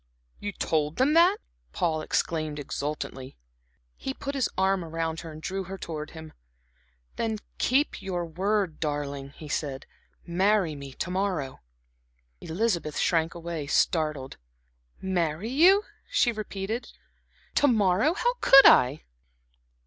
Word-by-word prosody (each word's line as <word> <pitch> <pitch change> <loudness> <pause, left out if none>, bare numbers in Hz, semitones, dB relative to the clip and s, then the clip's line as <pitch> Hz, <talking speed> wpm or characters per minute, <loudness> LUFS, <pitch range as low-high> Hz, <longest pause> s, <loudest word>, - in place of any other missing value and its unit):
"You 205 - -4
told 155 -5 -1
them 275 +4 +3
that?" 350 +5 +5 0.4
Paul 165 -5 0
exclaimed 155 -1 -1
exultantly. 140 -2 -5 0.6
He 265 - -5
put 280 - -5
his 270 -4 0
arm 190 -1 +2
around 165 0 -3
her 165 - -8
and 155 - -9
drew 190 +3 -4
her 195 +2 -7
towards 155 -4 -6
him. 160 -1 -10 0.8
"Then 225 -1 -1 0.2
keep 270 0 +1
your 180 -3 -3
word, 190 +1 -1
darling," 145 -2 -3
he 155 - -9
said. 145 -3 -3 0.4
"Marry 190 -1 +2
me 140 -2 -9
to 175 - -4
morrow." 180 -8 -2 0.8
Elizabeth 170 - -1
shrank 165 -1 +1
away, 165 -3 -5
startled. 150 -4 0 0.6
"Marry 180 +2 -1
you," 370 +9 +6 0.3
she 240 - +3
repeated. 215 +1 -5 0.6
"To 290 - +4
morrow, 220 - +3
how 485 +4 +1
could 275 0 +8
I?" 130 +5 +6
170 Hz, 125 wpm, -27 LUFS, 155-210 Hz, 0.8 s, could